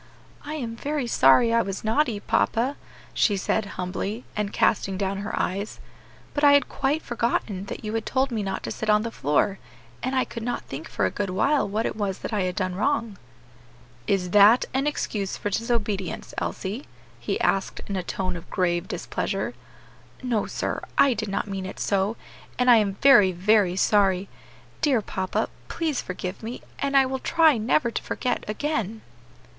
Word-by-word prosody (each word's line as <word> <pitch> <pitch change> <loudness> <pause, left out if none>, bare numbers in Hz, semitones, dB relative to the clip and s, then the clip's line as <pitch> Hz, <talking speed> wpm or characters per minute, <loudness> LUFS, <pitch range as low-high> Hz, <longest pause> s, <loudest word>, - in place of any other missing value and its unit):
"I 300 +1 -5
am 235 -6 -4
very 285 +2 -2
sorry 230 - +5
I 230 - +4
was 195 -2 -4
naughty, 225 0 +1
papa," 240 +6 +1 0.4
she 205 -3 +2
said, 205 +2 0
humbly, 195 +5 -3
and 210 -1 -1
casting 195 -3 +1
down 195 0 -1
her 205 +1 -3
eyes, 200 +3 -2 0.5
"but 290 - -2
I 285 -1 +8
had 285 - +4
quite 285 +3 -1
forgotten 230 -5 -1
that - - -6
you 215 - -3
had 225 -1 -1
told 265 0 +1
me 225 -2 -1
not 195 -1 -3
to - - -4
sit 220 - -4
on 210 0 +4
the 230 - -4
floor, 190 - +1 0.4
and 260 +1 -2
I 260 - +2
could 230 - -7
not 240 +1 -3
think 140 +4 -8
for 100 - 0
a 95 - 0
good 200 -2 -2
while 265 +5 +2
what 215 +3 -1
it - - -2
was 200 -3 -2
that - - -4
I 210 - +1
had 180 -1 -2
done 185 -3 -1
wrong." 220 0 -1 0.9
"Is 180 -3 0
that 210 +4 +7
an 270 +2 +1
excuse 205 -9 -2
for 205 - -3
disobedience, 210 -4 -2
Elsie?" 205 +8 -4 0.3
he 120 - -2
asked 195 -1 0
in 200 - -4
a 185 - 0
tone 185 +1 -3
of 170 - -9
grave 175 -1 0
displeasure. - - -3 0.7
"No, 235 -5 0
sir; - - -3 0.2
I 275 -2 +6
did 220 -2 -4
not 195 - -2
mean 195 -1 -4
it - - -8
so, 200 +2 0 0.4
and 250 0 +5
I 235 - +8
am 200 -3 +1
very, 210 -9 +7
very 190 0 +3
sorry; 195 -1 +2 0.5
dear 265 -8 +2
papa, 190 -1 -2 0.2
please 315 -5 -1
forgive 180 +1 -5
me, 230 +3 -6 0.2
and 280 0 +2
I 270 - +6
will 265 0 -3
try 315 -3 +4
never 235 +2 +2
to - - -3
forget 250 - -2
again." 220 -2 -2
210 Hz, 185 wpm, -25 LUFS, 195-245 Hz, 0.9 s, I